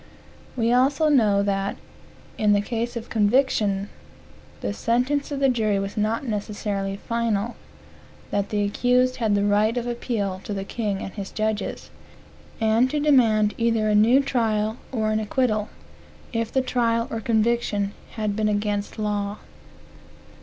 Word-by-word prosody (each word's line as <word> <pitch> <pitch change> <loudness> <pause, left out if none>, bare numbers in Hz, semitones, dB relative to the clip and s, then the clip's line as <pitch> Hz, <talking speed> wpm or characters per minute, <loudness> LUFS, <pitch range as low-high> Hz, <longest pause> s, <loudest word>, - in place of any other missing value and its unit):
We 230 0 +2
also 275 +5 +3
know 210 -8 +4
that, 195 0 -1 0.6
in 205 -1 +3
case 235 +2 -3
of 230 0 -6
conviction, 210 -3 +2 0.7
the 100 - -2
sentence 250 - 0
of 280 - -2
the 275 - +4
jury 220 -5 +1
was 195 0 -3
not 220 +5 0
necessarily 205 -3 -3
final; 230 0 -1 0.8
that 200 0 -1
the 205 -1 0
accused 250 +5 +2
had 220 -4 +1
the 200 0 +1
right 210 +3 +2
of 240 - -1
appeal 225 -6 -2
to 205 - -4
the 195 - -3
king 205 -1 -3
and 190 - -7
his 200 -2 -6
judges, 215 -1 -3 0.7
and 225 +3 +3
to 300 - -1
demand 230 -8 +4
either 225 -2 +2
a - - +2
new 230 +6 +5
trial, 220 -4 0
or 220 -4 0
an 215 - +1
acquittal, 215 -1 0 0.6
if 230 -1 -1
the 265 - +2
trial 230 -2 +1
or 225 - -3
conviction 220 -2 +1 0.2
had 215 -2 -2
been 215 0 +1
against 205 0 -2
law. 205 -1 -2
220 Hz, 145 wpm, -24 LUFS, 205-240 Hz, 0.8 s, new